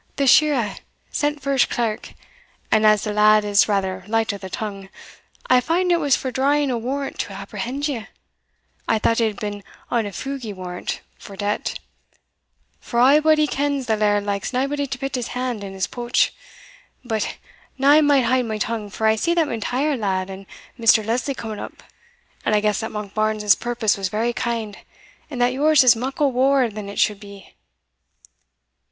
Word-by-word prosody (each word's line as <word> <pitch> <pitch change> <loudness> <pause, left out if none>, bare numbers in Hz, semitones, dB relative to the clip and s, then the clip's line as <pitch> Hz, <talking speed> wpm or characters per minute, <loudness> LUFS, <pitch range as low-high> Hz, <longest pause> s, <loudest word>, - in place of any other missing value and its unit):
"The 280 - 0
shirra 260 -7 +4 0.3
sent 295 -1 -1
for 275 - -1
his 270 -2 +4
clerk, 225 -3 -3 0.6
and 215 0 +4
as 215 -1 +4
the 210 - -2
lad 210 0 +5
is 205 0 +4
rather 190 -2 -1
light 225 0 0
o' 200 - -7
the 190 - -8
tongue, 195 -1 -6 0.6
I 255 0 +5
fand 350 +7 +1
it 345 - +3
was 285 -4 +3
for 260 - -4
drawing 280 +2 +1
a 240 - -1
warrant 270 +4 -4
to - - -3
apprehend 275 +5 -4
you 240 -7 -4 0.8
I 225 - +2
thought 230 +2 +1
it 225 - +3
had 210 - -5
been 205 -1 -5 0.3
on 230 -3 +1
a - - -6
fugie 250 0 -5
warrant 180 -1 -5 0.2
for 200 - -11
debt; 205 +1 -2 1.0
for 235 - -3
a' 270 +5 +6
body 310 0 +4
kens 285 -2 -1
the 220 -1 +1
laird 205 -1 +1
likes 200 -1 -2
naebody 280 +2 -1
to 265 0 -4
pit 270 +1 -4
his 250 -3 -2
hand 250 -4 -3
in 195 -1 -7
his 190 0 -1
pouch 240 0 0 0.7
But 220 -3 -2 0.4
now 275 +1 +4
I 305 +1 +7
may 285 -3 +4
haud 250 +1 +2
my 220 -1 -3
tongue, 215 -1 -3
for 220 +2 -3
I 220 0 +4
see 340 +10 0
the 340 - +3
M'Intyre 265 +4 -1
lad 190 -2 -1
and 190 0 -10 0.3
Mr. 225 -2 +4
Lesley 250 +5 -1
coming 220 -4 -6
up, - - -9 0.6
and 215 - +1
I - - +4
guess 210 -1 0
that 220 - -4
Monkbarns's 210 0 +1
purpose 235 -4 -1
was 195 -2 -2
very 225 +4 -1
kind, 230 -4 -3 0.5
and 265 -5 -6
that 245 +1 +2
yours 300 +1 +4
is 245 -2 +6
muckle 270 +4 -1
waur 260 0 +3
than 210 -1 -7
it 200 - -8
should 210 -2 +2
be." 200 -1 -13
230 Hz, 185 wpm, -22 LUFS, 210-270 Hz, 1.0 s, I